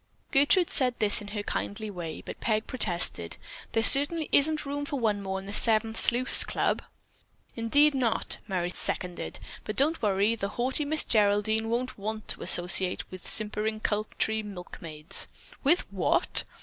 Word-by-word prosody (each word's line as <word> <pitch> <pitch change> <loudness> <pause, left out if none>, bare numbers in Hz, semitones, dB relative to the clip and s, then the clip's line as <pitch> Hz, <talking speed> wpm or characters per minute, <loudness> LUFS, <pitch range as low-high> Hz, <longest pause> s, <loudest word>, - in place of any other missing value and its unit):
Gertrude 300 +6 +3
said 255 -3 +3
this 210 0 +2
in 205 - -10
her 205 0 -6
kindly 210 +1 -5
way, 170 -4 -8
but - - -9
Peg 215 -1 -1
protested: 175 - -1 0.4
"There 225 - 0
certainly 290 +6 +7
isn't 305 +1 +2
room 285 +1 -5
for 285 -1 -5
one 210 -4 -1
more 190 -1 -5
in 190 - -9
the 200 - -8
Seven 220 0 +5
Sleuths' 240 +3 +3
Club." - - -2 0.7
"Indeed 285 +6 +2
not!" 250 -4 -1
Merry 180 -3 -3
seconded. 180 -1 -3 0.2
"But 215 - -6
don't 310 +5 0
worry, 205 +1 0
the 200 -3 -5
haughty 260 +5 -2
Miss 310 +2 +1
Geraldine 215 +1 0
won't 245 0 -4
want 215 +1 -6
to - - -1
associate 180 +1 +3
with 185 -1 -10
simpering 215 0 0
country 215 +1 -2
milkmaids." 175 -6 -4 0.4
"_With 325 +6 +2
what? - - 0
220 Hz, 155 wpm, -26 LUFS, 200-260 Hz, 0.7 s, certainly